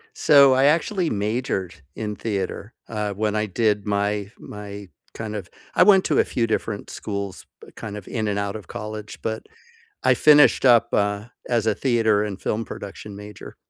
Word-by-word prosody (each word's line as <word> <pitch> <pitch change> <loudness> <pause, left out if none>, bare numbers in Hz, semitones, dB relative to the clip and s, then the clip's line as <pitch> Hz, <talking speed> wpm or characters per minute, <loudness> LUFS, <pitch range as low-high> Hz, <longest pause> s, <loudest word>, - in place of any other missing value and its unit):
So 140 - +6
I 135 +1 +4
actually 170 +4 +2
majored 105 -3 -2 0.2
in 105 -2 -4
theater, 100 +1 -4
uh, 105 -2 -2
when 105 +1 -1
I 105 0 0
did 105 0 0
my 100 0 -1
my 100 -1 -9 0.3
kind 110 -1 -5
of 100 -4 -6 0.3
I - - +5
went 195 -2 +6
to 150 - +2
a - - +5
few 115 - -1
different 110 -2 -3
schools 100 -2 -5 0.3
kind 105 -1 -6
of 105 - -9
in 110 -3 -2
and 100 -1 -1
out 100 +1 -2
of 105 - -11
college, 105 0 -7
but 110 0 -3 0.6
I - - +5
finished 145 -4 +5
up, 120 -2 +6
uh, 100 0 0 0.2
as 115 -3 +1
a 110 -2 +2
theater 110 -4 +2
and 100 -2 -5
film 110 +1 -2
production 100 0 -8
major. 105 0 -10
105 Hz, 175 wpm, -23 LUFS, 100-115 Hz, 0.6 s, So